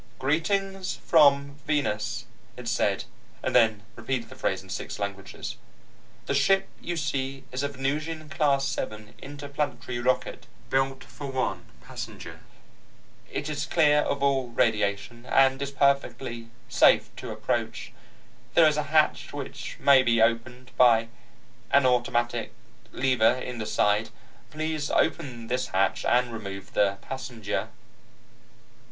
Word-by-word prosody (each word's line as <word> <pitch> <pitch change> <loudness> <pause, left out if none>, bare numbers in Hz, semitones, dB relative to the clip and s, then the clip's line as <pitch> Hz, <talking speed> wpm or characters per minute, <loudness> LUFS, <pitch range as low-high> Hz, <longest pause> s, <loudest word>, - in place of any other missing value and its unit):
"Greetings 190 - 0
from 140 -3 +4
Venus," 120 -6 -1 0.3
it 125 -1 -8
said, 100 -4 +1 0.4
and 130 - -1
then 110 -4 +4
repeated 115 +1 -3
the 130 - -11
phrase 95 -7 -1
in 95 - -17
six 95 - -5
languages. 100 -1 -5 0.7
"The - - -1
ship 195 +8 +3
you 175 -1 -3
see 135 -2 -2
is 130 +1 -2
a 140 - 0
Venusian 150 +3 -3
Class 140 -3 +1
7 110 -6 -5
interplanetary 140 -3 -4
rocket, 130 +1 -1 0.2
built 135 0 0
for 145 - -9
one 125 -10 -2 0.2
passenger. - - -8 0.9
It 145 - -3
is 145 -2 -3
clear 150 -1 +4
of 140 -1 -1
all 135 -2 +2
radiation, 110 0 0
and 135 0 +4
is 140 - -2
perfectly 140 -4 0 0.2
safe 115 - +4
to - - -7
approach. - - -3 0.6
There 165 - +7
is 150 -1 +2
a 150 - +1
hatch 155 -1 +2
which - - -6
may 140 -2 +6
be 120 -2 +2
opened 120 +2 0
by 115 -2 +5 0.6
an 140 -1 +4
automatic 120 -1 +1 0.4
lever 125 -4 +3
in 125 -1 -6
the 110 - -3
side. 105 +1 +2 0.4
Please 155 -1 -3
open 130 -8 0
this 125 +2 -1
hatch 95 +1 +1
and 120 -1 +2
remove 100 -3 -7
the 100 -1 +2
passenger." 115 -6 -4
130 Hz, 130 wpm, -27 LUFS, 115-140 Hz, 0.9 s, There